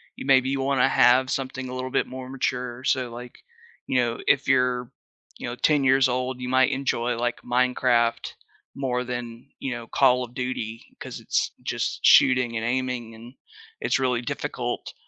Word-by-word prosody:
you - - -8
maybe 130 -1 +4
you 135 0 -1
wanna 135 -1 +2
have 130 +2 +4
something 130 -1 -3
a - - -6
little 130 0 -4
bit - - +1
more 130 0 -8
mature 125 -1 -3
so 130 -2 0
like, 120 +1 -10 0.5
you 130 - 0
know, 120 -1 0
if 140 - +3
you're, 125 -2 +1 0.5
you - - -6
know, 120 - -4
10 150 +2 +2
years 135 0 +4
old, 125 0 -2
you 125 - -4
might 130 0 +3
enjoy, 125 -3 -1
like, 120 +1 -2
Minecraft 125 -1 +1 0.4
more 125 -2 -1
than, 120 0 -6
you 135 - -3
know, 115 -1 -8
Call 125 -1 +3
of 120 - -9
Duty, 120 -3 -4 0.2
'cause - - -7
it's - - -1
just - - -2
shooting 125 -3 +5
and 110 - -3
aiming 125 -2 -2
and 115 +3 -13 0.5
it's - - +1
really 125 -2 0
difficult, 120 - -4
125 Hz, 175 wpm, -25 LUFS, 120-130 Hz, 0.5 s, shooting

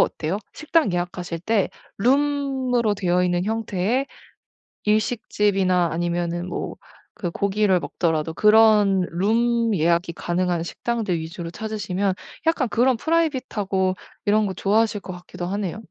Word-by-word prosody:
어때요? 165 +5 0
식당 305 - +1
예약하실 175 -1 -3
때 210 +1 +1 0.3
룸으로 265 -2 +1
되어 180 -2 +1
있는 175 0 0
형태의 220 +3 -1 0.8
일식집이나 205 -5 +1
아니면은 175 +1 -2
뭐 - - -4 0.4
그 175 -4 -3
고기를 200 -1 +2
먹더라도 160 -2 -1
그런 210 -3 +5
룸 230 +5 +1
예약이 170 0 +2
가능한 175 0 -1
식당들 220 0 -2
위주로 165 +1 -6
찾으시면 200 -1 -2 0.3
약간 320 -5 +2
그런 245 +2 +2
프라이빗하고 240 - 0 0.3
이런 210 +1 +3
거 190 - -2
좋아하실 210 +3 +1
것 185 - -8
같기도 180 0 -7
하네요. 200 +2 -3
200 Hz, 305 characters per minute, -23 LUFS, 175-225 Hz, 0.8 s, 그런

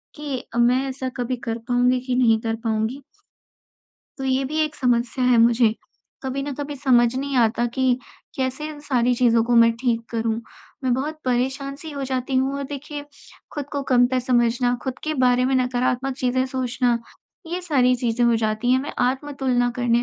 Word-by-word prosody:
कि 290 -4 -4
अ, - - -4
मैं 250 +3 +3
ऐसा 260 0 -4
कभी 250 +1 -2
कर 225 0 -1
पाऊँगी 250 +1 +3
कि 250 - 0
नहीं 230 -3 +4
कर 225 0 -1
पाऊँगी? 225 +4 -1 1.2
तो 270 - -4
ये 265 0 +1
भी 305 +4 -3
एक 305 -1 0
समस्या 245 -1 0
है 250 -1 +4
मुझे, 230 -1 +4 0.5
कभी 265 +1 -3
ना 285 +1 -4
कभी 290 0 -4
समझ 245 -3 +3
नहीं 275 0 -2
आता 235 0 +2
कि 260 -1 +2 0.4
कैसे 265 +3 -2
इन 300 -1 -9
सारी 250 -4 +1
चीज़ों 235 -2 +3
को 240 +1 +1
मैं 230 0 +6
ठीक 235 -3 0
करूँ? 225 -1 -1 0.4
मैं 255 - +2
बहुत 300 +5 -3
परेशान-सी 270 +4 -2
हो 280 -2 -5
जाती 260 0 -2
हूँ 265 +1 +1
और 280 - -3
देखिए, 290 +1 -6 0.5
खुद 290 -2 -4
को 285 -1 -1
कमतर 250 0 +4
समझना, 245 0 +2
खुद 260 -1 -4
के 310 0 -1
बारे 250 -2 +3
में 265 +1 +1
नकारात्मक 255 +1 0
चीजें 255 0 +1
सोचना, 250 -2 0 0.5
ये 350 +2 -3
सारी 265 -8 +3
चीजें 240 -1 -1
हो 235 -1 +4
जाती 220 +2 0
हैं 260 - +4
मैं 285 - -6
आत्म-तुलना 260 -2 0
करने 240 -1 +2
255 Hz, 185 wpm, -23 LUFS, 240-270 Hz, 1.2 s, मैं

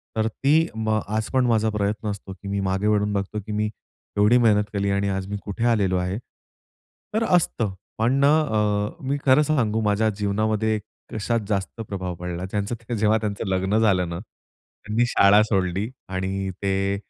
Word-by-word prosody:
तर 110 0 +1
ती, 145 +8 +2
म, 110 -1 0
आज 110 +2 -2
पण 130 -1 +3
माझा 110 -2 +2
प्रयत्न 105 0 -1
असतो, 100 -1 -7
की 100 +1 -12
मी 100 0 -1
मागे 95 +2 0
वळून 105 -1 +2
बघतो, 100 +1 -2
की 110 - -6
मी 105 0 0 0.5
एवढी 105 +4 +5
मेहनत 110 -3 +4
केली 100 -1 0
आणि 100 0 +1
आज 95 -1 -2
मी 105 +1 -3
कुठे 105 +3 -4
आलेलो 100 -6 +2
आहे. 90 +2 -1 1.0
तर 220 +1 +1
असतं. 160 - +1 0.2
पण 115 +3 +2
ना 140 - +5
अ, 105 -6 0
मी 140 +2 0
खरं 135 +2 +6
सांगू 115 -8 +1
माझ्या 105 +1 +2
जीवनामध्ये 110 +1 0 0.3
कशात 115 +2 0
जास्त 100 +2 -2
प्रभाव 95 -2 -4
पडला. 90 +1 -5
ज्यांचं 115 +3 -3
जेव्हा 110 0 +3
त्यांचं 105 0 -3
लग्न 95 +2 +1
झालं 95 -5 +3
ना, 85 0 -4
त्यांनी 110 +2 -5
शाळा 100 -2 +5
सोडली 95 0 0 0.2
आणि 95 +1 -2
ते 100 0 +1
105 Hz, 170 wpm, -24 LUFS, 100-110 Hz, 1.0 s, खरं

